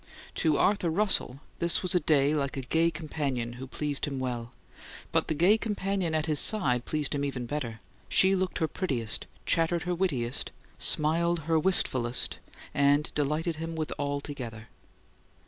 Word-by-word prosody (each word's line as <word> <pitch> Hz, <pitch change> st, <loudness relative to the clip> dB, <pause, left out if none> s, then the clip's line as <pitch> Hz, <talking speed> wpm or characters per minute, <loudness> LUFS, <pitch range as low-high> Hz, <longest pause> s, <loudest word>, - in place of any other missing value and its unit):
To 155 Hz, -2 st, +3 dB
Arthur 195 Hz, -3 st, +2 dB
Russell 165 Hz, -7 st, +1 dB, 0.2 s
this 170 Hz, +2 st, +2 dB
was 180 Hz, -, 0 dB
a 180 Hz, -, +4 dB
day 145 Hz, -3 st, +3 dB
like 140 Hz, -2 st, -1 dB
a -, -, -2 dB
gay 160 Hz, +6 st, +2 dB
companion 145 Hz, -7 st, -3 dB
who 130 Hz, +2 st, -8 dB
pleased 145 Hz, +2 st, -2 dB
him 140 Hz, -2 st, -4 dB
well; 120 Hz, -2 st, -3 dB, 0.6 s
but -, -, +2 dB
the 155 Hz, -, -1 dB
gay 190 Hz, +8 st, +4 dB
companion 195 Hz, -6 st, -1 dB
at 155 Hz, -1 st, +1 dB
his 150 Hz, -2 st, +2 dB
side 125 Hz, -, +3 dB
pleased 150 Hz, -2 st, -1 dB
him 140 Hz, -1 st, -1 dB
even 135 Hz, -3 st, -3 dB
better. 120 Hz, -4 st, -4 dB, 0.3 s
She 190 Hz, +1 st, +4 dB
looked 185 Hz, -1 st, -1 dB
her 160 Hz, -, +1 dB
prettiest, 130 Hz, -, -2 dB, 0.2 s
chattered 165 Hz, 0 st, +1 dB
her 180 Hz, 0 st, -1 dB
wittiest, 135 Hz, -10 st, -1 dB, 0.3 s
smiled 165 Hz, +2 st, +3 dB
her 160 Hz, +1 st, +1 dB
wistfulest, 130 Hz, -9 st, +2 dB, 0.3 s
and 145 Hz, +1 st, +2 dB
delighted 155 Hz, +3 st, -1 dB
him 165 Hz, +1 st, -5 dB
with 155 Hz, -1 st, -3 dB
all 145 Hz, 0 st, -1 dB
together. 115 Hz, -6 st, -7 dB
150 Hz, 165 wpm, -28 LUFS, 135-170 Hz, 0.6 s, a